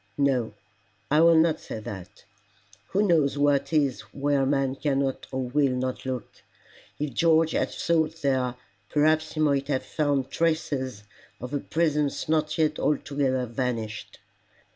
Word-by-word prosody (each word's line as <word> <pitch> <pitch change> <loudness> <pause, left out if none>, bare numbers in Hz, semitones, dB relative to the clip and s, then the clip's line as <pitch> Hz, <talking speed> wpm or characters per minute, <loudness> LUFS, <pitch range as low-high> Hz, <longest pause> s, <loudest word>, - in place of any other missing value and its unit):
No 130 -6 +1 0.6
I 150 +2 +5
will 165 0 +6
not 160 0 +3
say - - -7
that: 100 -2 -9 0.6
who 200 +2 +1
knows 150 -5 +2
what 145 +1 +2
is 145 -5 +1
where 140 -1 +1
man 135 -1 +1
cannot 135 -1 -1
or 130 -1 -2
will 140 0 +2
not 130 +1 -3
look? 130 -2 -5 0.6
If 145 -3 -3
George 160 +2 +3
had - - 0
sought 160 -1 0
there, 130 -3 +1 0.3
perhaps 155 +1 +2
he 155 - -5
might 140 -3 +2
have 135 -3 -1
found 145 -4 -1
traces 140 -8 -1 0.4
of 125 +4 -7
a 145 - 0
presence 150 -3 0
not 155 0 0
yet 155 -1 +1
altogether 140 -3 0
vanished. 115 -3 -4
140 Hz, 140 wpm, -26 LUFS, 130-155 Hz, 0.6 s, will